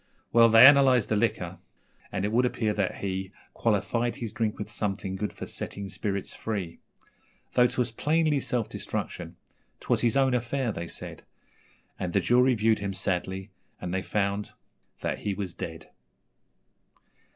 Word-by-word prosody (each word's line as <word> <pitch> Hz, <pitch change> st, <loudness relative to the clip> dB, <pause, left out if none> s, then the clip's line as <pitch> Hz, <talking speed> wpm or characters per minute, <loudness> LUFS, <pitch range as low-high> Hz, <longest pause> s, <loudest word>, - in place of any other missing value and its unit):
Well, 115 Hz, 0 st, +7 dB
they 115 Hz, +2 st, +9 dB
analysed 135 Hz, -4 st, +6 dB
the 110 Hz, -, +2 dB
liquor, 105 Hz, -, -1 dB, 0.5 s
and 95 Hz, -, -1 dB
it 105 Hz, -, -1 dB
would 120 Hz, +3 st, +3 dB
appear 115 Hz, -3 st, 0 dB
that 100 Hz, -3 st, -1 dB
he 95 Hz, -1 st, -3 dB, 0.2 s
Qualified 115 Hz, +2 st, 0 dB
his 115 Hz, -3 st, -5 dB
drink 115 Hz, -4 st, -1 dB
with 105 Hz, +1 st, -6 dB
something 100 Hz, -2 st, -3 dB
good 105 Hz, +2 st, -3 dB
for -, -, -7 dB
setting 100 Hz, -1 st, -6 dB
spirits 100 Hz, 0 st, -3 dB
free. 100 Hz, -7 st, -4 dB, 0.7 s
Though 125 Hz, 0 st, +5 dB
'twas 125 Hz, -1 st, -1 dB
plainly 155 Hz, +4 st, +2 dB
self 120 Hz, -3 st, -1 dB
destruction -, -, -5 dB, 0.4 s
''twas -, -, +1 dB
his 120 Hz, +2 st, +2 dB
own 135 Hz, -1 st, +3 dB
affair,' 125 Hz, 0 st, 0 dB
they 85 Hz, -3 st, -5 dB
said; -, -, -8 dB, 0.8 s
And 90 Hz, -1 st, -3 dB
the -, -, +4 dB
jury 125 Hz, +7 st, +4 dB
viewed 110 Hz, 0 st, +2 dB
him 100 Hz, -1 st, -3 dB
sadly, 95 Hz, +2 st, -2 dB, 0.3 s
and 90 Hz, 0 st, -4 dB
they 95 Hz, -, 0 dB
found 100 Hz, +1 st, -1 dB, 0.5 s
that -, -, -2 dB
he 100 Hz, -2 st, -2 dB
was 95 Hz, -4 st, -4 dB
dead. 80 Hz, -2 st, -7 dB
105 Hz, 155 wpm, -27 LUFS, 95-120 Hz, 0.8 s, they